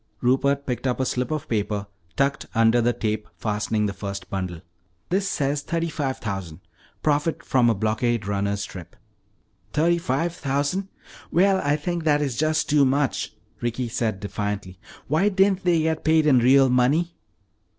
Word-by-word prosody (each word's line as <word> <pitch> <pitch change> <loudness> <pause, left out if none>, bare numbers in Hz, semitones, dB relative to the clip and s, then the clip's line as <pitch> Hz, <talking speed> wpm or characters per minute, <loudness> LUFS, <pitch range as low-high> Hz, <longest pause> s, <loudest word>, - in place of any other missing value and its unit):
Rupert 140 +3 +2
picked 125 +1 -2
up 125 - -1
a 130 - +1
slip 125 0 -1
of 155 -1 -3
paper 105 -2 -1 0.3
tucked 140 +1 0
under 115 +1 +4
the 120 +1 +3
tape 110 -2 -2
fastening 105 0 -1
the 100 - -2
first 100 -1 -6
bundle. 90 -4 -4 0.5
"This 190 +2 +1
says 140 -3 0
thirty 165 +3 -2
five 140 -4 -2
thousand 95 -6 -5 0.4
profit 150 +2 0
from 125 -3 +3
a 115 - +2
blockade 110 +2 0
runner's 100 0 -1
trip." 90 -3 -10 0.8
"Thirty 170 +3 +3
five 165 +3 -1
thousand! 145 +6 -1 0.4
Well, 190 +2 +3
I 145 +1 +2
think 170 +3 -3
that 150 -2 +4
that 150 - 0
is 130 -4 -3
just 155 +3 +1
too 145 -1 +4
much," 140 +1 0 0.3
Ricky 120 +1 -2
said 110 -3 -1
defiantly. 100 -2 -4 0.3
"Why 160 +8 +3
didn't 190 -1 +2
they 170 -3 +3
get 160 0 -1
paid 160 0 +4
in 135 -5 +5
real 135 +3 +5
money?" 145 +8 +2
130 Hz, 165 wpm, -24 LUFS, 110-155 Hz, 0.8 s, in